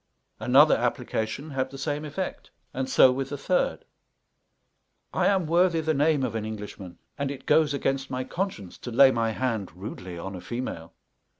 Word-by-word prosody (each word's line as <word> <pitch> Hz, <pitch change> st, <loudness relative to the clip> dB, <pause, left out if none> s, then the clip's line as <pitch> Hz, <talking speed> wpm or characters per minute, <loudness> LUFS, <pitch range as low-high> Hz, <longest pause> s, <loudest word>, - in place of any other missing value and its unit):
Another -, -, +6 dB
application 110 Hz, +8 st, -2 dB
had 130 Hz, -1 st, -1 dB
the 135 Hz, -, -9 dB
same 145 Hz, +2 st, -2 dB
effect, 170 Hz, +6 st, -5 dB, 0.2 s
and 130 Hz, 0 st, -2 dB
so 130 Hz, -, +6 dB
with 135 Hz, +1 st, -3 dB
the 145 Hz, -, -4 dB
third. 180 Hz, +6 st, 0 dB, 1.3 s
I -, -, +2 dB
am 190 Hz, -3 st, +2 dB
worthy 170 Hz, +1 st, +3 dB
the 160 Hz, 0 st, 0 dB
name 150 Hz, -1 st, +2 dB
of 120 Hz, -4 st, -1 dB
an 110 Hz, -1 st, -2 dB
Englishman, 105 Hz, -4 st, -7 dB, 0.2 s
and 140 Hz, -1 st, -1 dB
it 140 Hz, -1 st, -7 dB
goes 150 Hz, -1 st, +4 dB
against 135 Hz, -1 st, -1 dB
my 130 Hz, 0 st, -2 dB
conscience 130 Hz, -, -4 dB
to -, -, -7 dB
lay 130 Hz, +3 st, +7 dB
my 115 Hz, -2 st, 0 dB
hand 110 Hz, -4 st, -2 dB
rudely 90 Hz, -2 st, -7 dB
on 95 Hz, +3 st, -6 dB
a 90 Hz, -, -7 dB
female. 120 Hz, -9 st, -5 dB
130 Hz, 175 wpm, -26 LUFS, 110-150 Hz, 1.3 s, lay